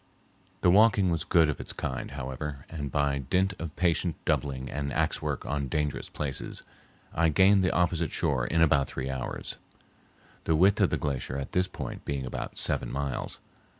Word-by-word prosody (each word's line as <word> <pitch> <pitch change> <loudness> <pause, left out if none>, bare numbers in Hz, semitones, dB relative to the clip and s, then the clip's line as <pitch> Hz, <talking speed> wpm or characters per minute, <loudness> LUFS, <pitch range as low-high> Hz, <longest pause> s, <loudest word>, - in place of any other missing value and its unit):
The 90 - +5
walking 100 -2 +5
was 80 -3 0
good 80 -2 +4
of 75 - -2
its - - -3
kind, - - -4
however, 70 +1 -5
and 75 -4 -4
by 70 0 +1
dint 95 +8 +1
of 80 -2 -5
patient 85 -1 +1
doubling 65 -2 -1
and 70 +1 -3
axe - - 0
work - - -3
on 70 -1 -2
dangerous 75 +2 -2
places, 70 -3 -4 0.5
I 85 0 +3
gained 95 +5 +5
the 90 - +3
opposite 85 -2 +1
shore 65 -5 0
in 85 +1 +3
about 70 -4 +3
three 65 0 -4
hours, 65 -1 -5 0.9
the 80 - +3
width 95 +5 +4
of - - +5
the - - 0
glacier 70 -2 -2
at 70 -1 -5
this 90 +1 +2
point - - -7
being 70 -2 -3
about 65 - -5
seven - - +1
miles. 70 -2 -2
75 Hz, 180 wpm, -28 LUFS, 70-85 Hz, 0.9 s, The